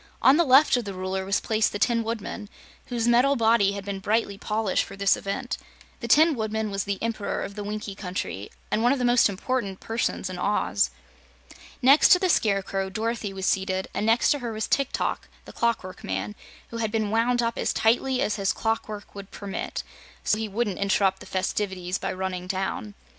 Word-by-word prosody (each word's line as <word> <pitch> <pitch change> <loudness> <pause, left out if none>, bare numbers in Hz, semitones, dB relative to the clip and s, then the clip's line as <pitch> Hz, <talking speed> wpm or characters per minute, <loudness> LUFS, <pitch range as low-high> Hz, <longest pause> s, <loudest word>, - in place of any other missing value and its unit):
On 265 - +6
the 340 - +4
left 275 0 +6
of 240 - -3
the 200 -2 -5
Ruler 190 +1 -3
was 195 0 +1
placed 220 -1 +1
the - - -3
Tin 230 +2 +2
Woodman, 220 -2 -5 0.4
whose 240 -2 -1
metal 250 +4 +4
body 225 -4 +3
had 200 -1 -6
been 200 -1 -4
brightly 210 +1 0
polished 210 0 0
for 195 - -10
this 195 0 +3
event. 245 +6 -4 0.4
The 235 - -5
Tin 315 +7 +6
Woodman 220 -2 -2
was 195 -1 -2
the 200 -1 -2
Emperor 225 -3 -2
of 200 - -6
the 205 0 -6
Winkie 210 0 -4
Country 180 - -5 0.2
and 220 - +1
one 240 +2 +4
of 280 - +2
the 250 - 0
most 240 -2 +5
important 200 -1 -2
persons 225 -3 -2
in 185 -1 -6
Oz. 205 +1 +1 0.9
Next 275 +4 +7
to - - +6
the 370 - +1
Scarecrow, 195 - +1
Dorothy 220 +1 -2
was 190 -1 -4
seated, 190 -1 0
and 210 +2 -1
next 225 +1 +4
to 290 - +1
her 240 -3 -4
was 220 0 -3
Tik 275 - +1
Tok, - - -2 0.2
the - - -11
Clockwork 225 -6 -2
Man, 95 +2 -3 0.4
who 230 - -6
had 220 -2 -1
been 215 -2 0
wound 240 +2 +2
up 230 0 -1
as - - 0
tightly 250 +3 +2
as 210 - -1
his 195 -1 +1
clockwork 220 -2 -3
would 200 -1 -9
permit, 200 -1 -5 0.4
so 215 - +1
he 220 -1 -3
wouldn't 205 -2 -2
interrupt 195 -1 +2
the - - -12
festivities 185 -1 -2
by - - -2
running 185 -1 -4
down. 195 +2 -3
210 Hz, 200 wpm, -25 LUFS, 195-235 Hz, 0.9 s, Next